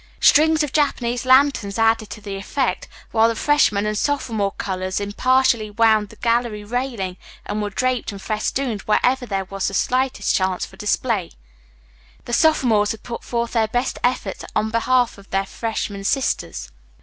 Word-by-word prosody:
Strings 315 +1 +5
of 290 - -4
Japanese 250 -5 0
lanterns 260 -6 +4
added 225 -1 +2
to 215 - -8
the 200 -1 -6
effect, 255 +7 -2 0.2
while 225 0 +4
the 230 - -1
freshmen 220 -8 +2
and 210 0 -1
sophomore 225 -5 0
colors 185 0 -3
impartially 230 +2 +2
wound 215 -1 +3
the - - -14
gallery 230 -3 0
railing 225 -5 -3 0.3
and 210 - -3
were 205 - -2
draped 255 +3 -1
and 200 - -8
festooned 215 +2 -2
wherever 250 +4 +2
there 195 -2 -2
was 195 +1 -3
the 195 - -3
slightest 255 -2 0
chance 185 -1 0
for - - -15
display. 210 -3 -1 1.0
The 240 - -6
sophomores 235 -9 +3
had 220 - -13
put 235 - -6
forth 235 -1 -2
their 225 -2 +2
best 245 +4 -2
efforts 245 -6 -1
in 220 0 0
behalf 240 -1 +1
of 200 - -17
their 195 0 0
freshman 205 -2 -4
sisters. 255 - -1
225 Hz, 160 wpm, -21 LUFS, 205-255 Hz, 1.0 s, Strings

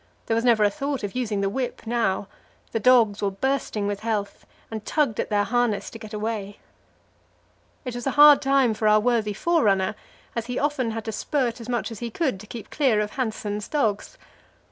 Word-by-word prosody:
There - - -1
was 230 +1 +1
never 235 -3 +4
a 205 - +4
thought 280 -3 -3
of 205 - -4
using 220 -5 -1
the 195 - +1
whip 245 +3 -3
now; 220 -4 0 0.4
the 225 - -1
dogs 225 -3 +4
were 200 - +1
bursting 215 0 -1
with 205 0 -2
health, 210 -2 -3 0.2
and 220 -1 -5
tugged 280 -6 0
at - - -1
their 205 -1 +2
harness 240 -1 0
to 225 - -9
get 215 -1 -10
away. 210 -2 -4 1.3
It 250 - -4
was 245 +2 -5
a 270 - -2
hard 295 -1 +9
time 270 -4 +3
for 215 0 0
our 215 0 +6
worthy 225 -2 +1
forerunner; 205 - +2 0.5
he 250 +2 -5
often 285 -5 0
had 225 0 -5
to 220 - -3
spurt 245 0 -1
as 230 - -9
much 240 -1 -1
as 220 - -7
he 235 - -4
could 265 - -1
to 215 - -12
keep 230 -1 -9
clear 260 -8 +2
of 210 0 -1
Hanssen's 210 -4 -3
dogs. 275 - -1
225 Hz, 200 wpm, -24 LUFS, 210-255 Hz, 1.3 s, hard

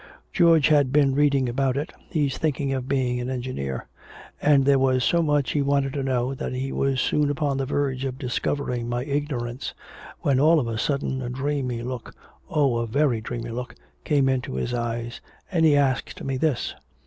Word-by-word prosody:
George 165 -5 +5
has 145 -2 +5
been 135 +1 +3
reading 140 -2 +3
about 130 +2 0
it, 150 +3 -3 0.2
he's 145 -5 0
thinking 140 -3 -1
of 130 -1 -3
being 130 -3 0
an 125 +1 -3
engineer. 120 - -4 0.5
And 140 -2 +4
there 140 -1 +5
was 130 -1 +2
so 170 +5 +3
much 150 -3 +1
he 145 - +1
wanted 140 -1 +1
to 140 - -2
know 130 -1 0
that 130 - -4
he 130 +1 -3
was 135 -1 0
soon 145 +4 +2
upon 145 -1 0
the 135 -1 -2
verge 135 -2 -1
of 130 -1 -3
discovering 125 -2 -2
my 120 +1 -2
ignorance 140 -4 -3 0.5
when 135 -2 +2
all 155 +3 +5
of 125 - -2
a 115 -1 -3
sudden 135 0 -1
a 120 - -4
dreamy 130 -2 -2
look, 125 -1 -6 0.3
oh, 140 -6 +2
a 115 0 -1
very 130 -1 +1
dreamy 120 0 -5
look, 125 +1 -5 0.3
came 140 -3 +2
into 130 - -1
his 120 - -2
eyes 120 0 -3 0.3
and 165 -3 +3
he 150 -2 +5
asked 135 -3 0
me 135 -1 -2
this." 140 -1 0
135 Hz, 190 wpm, -24 LUFS, 125-145 Hz, 0.5 s, George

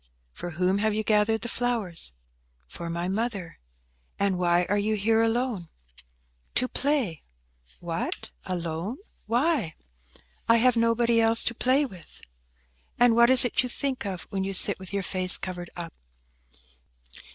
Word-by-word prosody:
"For 175 - -7
whom 185 +2 +1
have 215 0 0
you 215 - -1
gathered 215 +1 +2
the 235 - -4
flowers?" 225 - -1 0.6
"For 170 - -8
my 170 +1 -3
mother." 200 -3 -4 0.6
"And 195 -2 0
why 175 0 +2
are 205 - +1
you 215 +1 0
here 220 +2 +2
alone?" 225 -6 -1 0.9
"To 255 - +2
play." 265 - -1 0.6
"What, - - -4
alone? 175 +6 -4 0.3
Why?" 240 - 0 0.7
"I 230 - +7
have 250 +1 +3
nobody 230 0 +2
else 225 0 +3
to 240 - -1
play 260 +5 +2
with." 185 -10 -12 0.8
"And 240 -1 +5
what 235 +1 +5
is 260 -1 +9
it 245 - +1
you 250 - -4
think 270 +1 -2
of 185 -3 -5
when 195 -1 -2
you 195 0 -3
sit - - +4
with 190 -1 -10
your 200 -1 -2
face 185 0 +4
covered 180 -2 -6
up?" 170 -2 -7
215 Hz, 150 wpm, -26 LUFS, 180-240 Hz, 0.9 s, is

